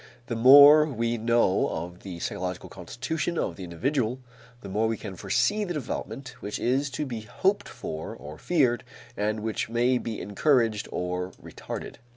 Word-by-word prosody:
The 120 - -3
more 145 +5 +9
we 115 -4 -1
know 115 -4 +2
of 85 +2 -5
the 95 -3 -8
psychological 90 +1 -4
constitution 135 - -4
of 85 - -1
the 95 - -8
individual, 120 - -1 0.4
the - - -9
more 105 +4 0
we 110 0 -1
can 100 -3 -7
foresee 205 - +1
the 175 -4 -3
development 135 -1 -5
which 105 - -4
is 135 +4 0
to 150 - -1
be 120 -5 -5
hoped 105 - 0
for 80 0 -6
or 75 +1 -10
feared 130 -9 +2 0.3
and 105 +1 -1
which 110 0 -2
may 120 +2 +2
be 115 -3 -5
encouraged 115 0 +1
or 90 +1 -3
retarded. - - -8
115 Hz, 165 wpm, -27 LUFS, 95-135 Hz, 0.4 s, more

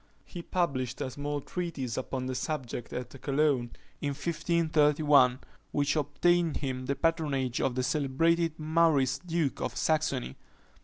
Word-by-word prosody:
He 175 - -7
published 135 -9 -1
a 130 - -3
small 145 +2 -3
treatise 150 -8 -4
upon 130 0 -3
the 130 - -2
subject 125 -4 -4
at 125 -1 -5
Cologne, 140 -3 +1 0.3
in 140 -1 -1
1531, 150 -4 +3 0.3
which 145 +1 +1
obtained 165 +3 +2
him 130 -2 -4
the 140 - 0
patronage 145 -7 0
of 125 - 0
the 130 - 0
celebrated 165 +4 +1
Maurice 155 -4 +2
duke 165 -5 -1
of - - -3
Saxony. 150 - 0
145 Hz, 135 wpm, -29 LUFS, 130-165 Hz, 0.3 s, 1531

